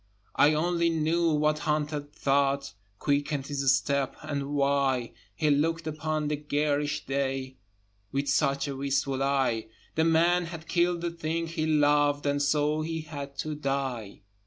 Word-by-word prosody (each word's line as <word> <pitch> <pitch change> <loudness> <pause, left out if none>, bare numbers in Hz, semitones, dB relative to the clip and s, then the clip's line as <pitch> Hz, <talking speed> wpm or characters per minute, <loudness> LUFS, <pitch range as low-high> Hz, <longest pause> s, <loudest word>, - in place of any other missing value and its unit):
I 150 +1 +5
only 170 +1 +1
knew 165 +1 +1
what 150 0 +2
hunted 150 -1 -2
thought 140 0 +1 0.2
Quickened 145 0 0
his 140 -2 +1
step, 140 0 -1
and 145 -1 -3
why 140 -3 +1 0.2
He 150 +6 +2
looked 165 +3 +1
upon 155 0 -2
the 150 - 0
garish 145 0 -1
day 135 -1 -2 0.5
With 140 +1 -1
such 140 0 +1
a 140 - -4
wistful 135 0 -1
eye; 135 -5 +1 0.3
The 160 - +2
man 170 +2 +3
had 165 -1 -8
killed 175 0 +1
the 170 0 -2
thing 165 0 -2
he 160 -1 -2
loved 145 -1 +3
And 145 0 +1
so 150 +1 +1
he 160 +1 -3
had 145 -3 -8
to 155 - -3
die. 135 -7 -3
145 Hz, 150 wpm, -28 LUFS, 140-155 Hz, 0.5 s, I